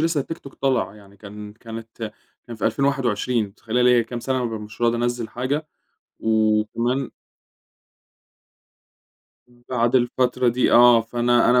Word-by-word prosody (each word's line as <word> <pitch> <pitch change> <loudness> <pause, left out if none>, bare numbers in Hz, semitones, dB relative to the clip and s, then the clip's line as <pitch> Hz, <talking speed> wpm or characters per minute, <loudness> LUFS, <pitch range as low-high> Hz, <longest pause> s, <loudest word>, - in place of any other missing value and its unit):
لسّه 165 -2 +1
التيك 165 +5 -5
توك 140 - -13
طلع. 135 -6 0
يعني 100 -1 -17
كان 105 0 -10
كانت 115 0 -8 0.3
كان 120 -2 -8
في - - -5
2021 125 -5 0
متخيلة 110 +4 -2
ليا 125 -1 +5
كام 120 +1 -6
سنة 130 0 -1
مش 110 -1 -6
راضي 120 0 +3
أنزل 120 -1 -2
حاجة! 140 +5 -2 0.5
وكمان 110 +4 +1 2.4
م 120 0 -24
بعد 120 -1 +1
الفترة 125 0 +1
دي 125 +2 +2
آه، 120 -1 +7
فأنا 120 +2 +2
أنا 125 0 +5
120 Hz, 135 wpm, -22 LUFS, 110-125 Hz, 2.4 s, آه